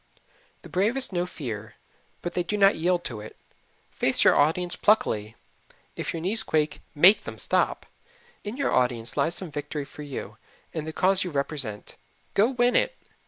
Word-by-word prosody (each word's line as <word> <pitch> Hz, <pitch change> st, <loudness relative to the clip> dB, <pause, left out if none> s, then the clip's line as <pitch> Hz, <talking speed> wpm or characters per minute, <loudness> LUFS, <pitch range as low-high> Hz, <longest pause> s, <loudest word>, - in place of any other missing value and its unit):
The -, -, -10 dB
bravest 215 Hz, +6 st, +1 dB
know 175 Hz, 0 st, 0 dB
fear, 110 Hz, -, -7 dB, 0.5 s
but 175 Hz, -, -3 dB
they 180 Hz, -, 0 dB
do 210 Hz, +4 st, -2 dB
not 195 Hz, 0 st, +5 dB
yield 175 Hz, +2 st, +1 dB
to 110 Hz, -4 st, -4 dB
it. 110 Hz, -, -11 dB, 0.5 s
Face -, -, +1 dB
your -, -, +6 dB
audience 175 Hz, +4 st, +2 dB
pluckily 110 Hz, -, +1 dB, 0.6 s
if -, -, -3 dB
your 165 Hz, -, -5 dB
knees 200 Hz, +4 st, +1 dB
quake, 155 Hz, -4 st, -1 dB
MAKE 180 Hz, +8 st, +6 dB
them -, -, -7 dB
stop. -, -, 0 dB, 0.6 s
In 210 Hz, +4 st, -5 dB
your 280 Hz, -, 0 dB
audience 120 Hz, -3 st, 0 dB
lies 170 Hz, +2 st, +1 dB
some 185 Hz, -5 st, -3 dB
victory 145 Hz, 0 st, -4 dB
for 150 Hz, -, -12 dB
you 145 Hz, -3 st, -7 dB, 0.4 s
and 160 Hz, -1 st, -4 dB
the -, -, -3 dB
cause 190 Hz, +3 st, +2 dB
you 180 Hz, -, -4 dB
represent. 140 Hz, -7 st, -4 dB, 0.4 s
Go 210 Hz, +4 st, +4 dB
win 245 Hz, -1 st, +2 dB
it. -, -, +2 dB
165 Hz, 170 wpm, -26 LUFS, 140-195 Hz, 0.6 s, your